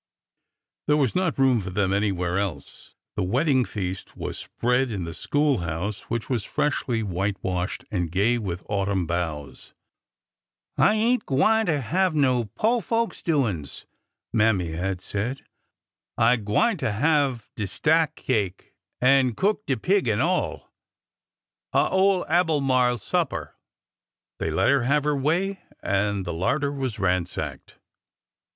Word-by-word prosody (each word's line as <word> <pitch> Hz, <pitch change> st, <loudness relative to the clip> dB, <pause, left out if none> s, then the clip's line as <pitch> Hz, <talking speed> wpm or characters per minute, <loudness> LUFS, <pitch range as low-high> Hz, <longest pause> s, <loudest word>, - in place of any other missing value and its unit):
There 150 Hz, -, +4 dB
was 135 Hz, -5 st, +1 dB
not 180 Hz, -4 st, 0 dB
room 130 Hz, -4 st, +3 dB
for 95 Hz, -, -5 dB
them 95 Hz, 0 st, 0 dB
anywhere 95 Hz, -3 st, 0 dB
else. 85 Hz, -9 st, -6 dB, 0.2 s
The -, -, -1 dB
wedding 130 Hz, -, +2 dB
feast 95 Hz, -2 st, -5 dB
was -, -, -4 dB
spread 125 Hz, +2 st, 0 dB
in 100 Hz, -5 st, -3 dB
the 85 Hz, 0 st, -5 dB
school 145 Hz, -, +1 dB
house, 90 Hz, +4 st, -4 dB
which 115 Hz, -1 st, -2 dB
was 120 Hz, -6 st, -1 dB
freshly 120 Hz, -2 st, -1 dB
whitewashed 95 Hz, -1 st, -2 dB
and 90 Hz, -5 st, -1 dB
gay 105 Hz, +7 st, +2 dB
with 90 Hz, -5 st, -4 dB
autumn 100 Hz, -2 st, 0 dB
boughs. 80 Hz, -4 st, -4 dB, 1.0 s
I 210 Hz, -, +4 dB
ain't 230 Hz, +2 st, +1 dB
gwineter 165 Hz, +2 st, +2 dB
have 180 Hz, +6 st, +1 dB
no 130 Hz, -5 st, +2 dB
po' 215 Hz, -, 0 dB
folks 230 Hz, 0 st, -1 dB
doin's," 110 Hz, -, -1 dB, 0.5 s
Mammy 105 Hz, -7 st, +2 dB
had 90 Hz, +2 st, -3 dB
said. 115 Hz, +8 st, -4 dB, 0.4 s
'' -, -, -66 dB, 0.2 s
I 115 Hz, +2 st, +5 dB
gwineter 115 Hz, -, +1 dB
have 140 Hz, -1 st, +1 dB
de 105 Hz, -3 st, -3 dB
stack 160 Hz, -, +2 dB
cake, 100 Hz, -7 st, -2 dB, 0.3 s
an' 130 Hz, -2 st, +4 dB
cook 210 Hz, +2 st, 0 dB
de 135 Hz, -, +2 dB
peeg 190 Hz, -, +1 dB
an' 110 Hz, -2 st, +1 dB
all -, -, -1 dB, 0.5 s
— -, -, -63 dB
a' -, -, +4 dB
ole 190 Hz, -1 st, +3 dB
Albemarle 135 Hz, -7 st, +2 dB
supper! 105 Hz, -, -2 dB, 0.4 s
" -, -, -67 dB
They -, -, -1 dB
let -, -, +2 dB
her 140 Hz, -1 st, +4 dB
have 140 Hz, +2 st, +2 dB
her 150 Hz, 0 st, +1 dB
way, 175 Hz, +8 st, 0 dB, 0.2 s
and 100 Hz, 0 st, 0 dB
the 85 Hz, -, -3 dB
larder 140 Hz, -, 0 dB
was 135 Hz, -5 st, -3 dB
ransacked. 90 Hz, -3 st, -2 dB
120 Hz, 140 wpm, -25 LUFS, 95-150 Hz, 1.0 s, I